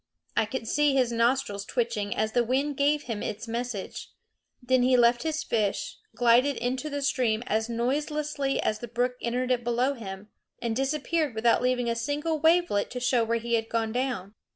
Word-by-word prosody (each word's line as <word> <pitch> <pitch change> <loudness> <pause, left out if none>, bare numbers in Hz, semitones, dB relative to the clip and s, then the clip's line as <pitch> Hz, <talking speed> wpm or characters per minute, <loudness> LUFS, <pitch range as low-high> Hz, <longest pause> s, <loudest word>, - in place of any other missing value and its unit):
I - - +3
could 225 0 -5
see 295 +2 +2
his 255 -3 +2
nostrils 230 -4 +1
twitching 225 -4 -2
as 215 0 0
the 240 +1 +2
wind 275 +5 0
gave 290 +2 +2
him 225 -4 -4
its 215 +2 -4
message. 235 -3 -4 0.5
Then 255 0 +2
he 255 0 +4
left 240 0 +4
his 315 -1 -2
fish, 210 -4 -1 0.2
glided 245 +4 +4
into 255 +5 -2
the 285 -1 -3
stream 245 -5 +1
as 220 +1 0
noiselessly 285 +3 -1
as 215 - 0
the 240 - -6
brook 245 +2 0
entered 250 +2 -1
it 245 -1 +1
below 240 +3 +1
him, 205 -4 -8 0.3
and 230 -2 -2
disappeared 295 +1 0
without 230 +1 +3
leaving 250 -1 +1
a 235 - 0
single 295 +7 -1
wavelet 320 -9 +3
to 250 - -5
show 245 -1 +2
where 230 +1 0
he 235 +1 -4
had 225 -1 +1
gone 225 -1 -1
down. 240 -6 -2
245 Hz, 185 wpm, -27 LUFS, 230-270 Hz, 0.5 s, he